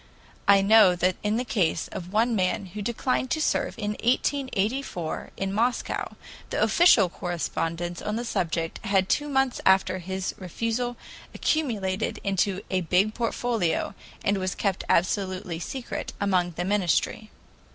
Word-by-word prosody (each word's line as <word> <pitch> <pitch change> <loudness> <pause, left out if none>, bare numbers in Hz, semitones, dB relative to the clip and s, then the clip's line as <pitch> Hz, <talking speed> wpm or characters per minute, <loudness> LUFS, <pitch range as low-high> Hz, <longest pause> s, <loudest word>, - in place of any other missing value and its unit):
I 200 -1 +7
know 200 -2 +6
that 180 +1 +1
in 210 +1 0
the 250 - -1
case 185 -8 0
of 180 0 -7
one 225 +3 +2
man 190 +1 0
who 210 - -5
declined 250 +4 -1
to 315 - 0
serve 310 - 0
in 210 -2 -2
1884 245 - -1
in 195 0 -2
Moscow, 235 +4 -1 0.3
the - - -2
official 295 - +5
correspondence 175 0 -3
on 210 - -2
the 240 +2 -3
subject 165 -5 -2
had 195 -3 +2
two 295 +7 0
months 270 -2 +1
after 190 -1 +3
his 190 +1 -3
refusal 230 +6 -2 0.4
accumulated 220 -10 -1
into 195 0 0
a 185 -1 +1
big 185 +5 +2 0.2
folio, 225 -8 -1 0.3
and 200 0 +2
was 185 0 -2
kept 195 -3 -1
absolutely 185 -2 0
secret 260 - -5
among 185 -3 +1
the 175 - -2
Ministry. 205 +2 0
200 Hz, 140 wpm, -26 LUFS, 185-230 Hz, 0.4 s, I